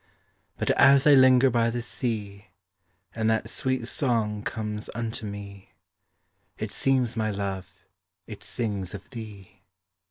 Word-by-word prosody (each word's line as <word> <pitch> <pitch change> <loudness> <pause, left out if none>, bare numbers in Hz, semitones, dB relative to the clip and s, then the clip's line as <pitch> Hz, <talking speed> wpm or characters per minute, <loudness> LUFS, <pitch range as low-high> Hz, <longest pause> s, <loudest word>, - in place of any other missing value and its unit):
But - - +1
as 140 0 +6
I 150 - +7
linger 130 -1 +6
by 115 -1 +2
the 120 +1 -3
sea, 105 -5 -4 0.7
And 110 -1 0
that 110 0 0
sweet 130 -3 -1
song 115 -7 0
comes 105 -2 -4
unto 115 -1 -4
me, 100 -1 -9 0.8
It - - -4
seems, 130 -4 +1
my 110 -1 0
love, 100 -2 -5 0.4
it - - -10
sings 100 -5 -3
of 100 - -10
thee. 100 -5 -10
110 Hz, 130 wpm, -26 LUFS, 100-125 Hz, 0.8 s, I